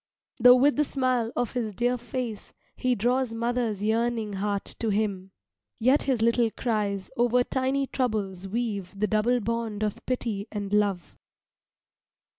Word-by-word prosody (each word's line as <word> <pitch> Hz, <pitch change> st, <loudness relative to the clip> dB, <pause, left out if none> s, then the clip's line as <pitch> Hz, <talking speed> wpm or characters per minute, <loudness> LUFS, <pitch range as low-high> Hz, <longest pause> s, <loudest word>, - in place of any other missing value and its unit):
Though 250 Hz, +1 st, +9 dB
with 280 Hz, +3 st, +3 dB
the 300 Hz, -, +4 dB
smile 255 Hz, -5 st, 0 dB
of 245 Hz, -, -1 dB
his 225 Hz, -5 st, -3 dB
dear 245 Hz, +3 st, +1 dB
face 240 Hz, -2 st, -5 dB, 0.2 s
he 255 Hz, -1 st, +1 dB
draws 245 Hz, +2 st, 0 dB
mother's 230 Hz, -3 st, -1 dB
yearning 225 Hz, -1 st, 0 dB
heart 200 Hz, 0 st, -2 dB
to 225 Hz, -, 0 dB
him, 200 Hz, -2 st, -1 dB, 0.5 s
yet 255 Hz, +5 st, +3 dB
his 255 Hz, -5 st, +1 dB
little 235 Hz, 0 st, +3 dB
cries 210 Hz, -5 st, -2 dB
over 245 Hz, +1 st, +3 dB
tiny 265 Hz, +2 st, 0 dB
troubles 205 Hz, -8 st, -2 dB
weave 200 Hz, -3 st, -3 dB
the 210 Hz, -, +2 dB
double 220 Hz, +3 st, +2 dB
bond 225 Hz, -1 st, -2 dB
of 210 Hz, -1 st, -3 dB
pity 230 Hz, -5 st, -2 dB
and 205 Hz, -1 st, -4 dB
love. 200 Hz, -4 st, 0 dB
230 Hz, 145 wpm, -27 LUFS, 205-245 Hz, 0.5 s, Though